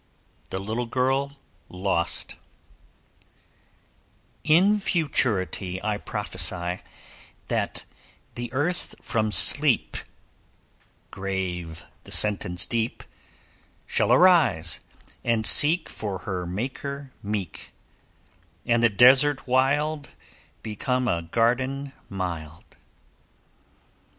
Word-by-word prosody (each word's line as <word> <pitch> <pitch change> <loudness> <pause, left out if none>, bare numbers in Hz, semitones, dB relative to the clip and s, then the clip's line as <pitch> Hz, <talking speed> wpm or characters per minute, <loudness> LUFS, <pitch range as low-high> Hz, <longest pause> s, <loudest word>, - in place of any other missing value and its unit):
THE - - -4
LITTLE 110 +5 -3
GIRL 135 +3 0 0.3
LOST 90 -2 -2 2.1
In 190 +7 +4
futurity 105 - 0
I 105 -1 -1
prophesy 90 -2 0 0.7
That - - -2 0.5
the 120 -1 -6
earth 145 +7 -2
from 110 -2 -1
sleep 125 - +3 1.1
(Grave 90 -4 -4 0.2
the - - -12
sentence 95 -4 +3
deep) 115 -1 -2 0.8
Shall - - +1
arise, 120 - +4 0.4
and 115 -2 +1
seek 160 +3 +4
For 100 -3 -5
her 90 -1 -5
Maker 135 +7 -5
meek; 100 -4 -5 0.9
And 120 0 +2
the 115 - +5
desert 130 +6 +5
wild 145 +4 0 0.5
Become 125 +4 -2
a 85 -5 0
garden 130 +9 -1 0.2
mild. 85 -5 -6
115 Hz, 80 wpm, -25 LUFS, 95-140 Hz, 2.1 s, the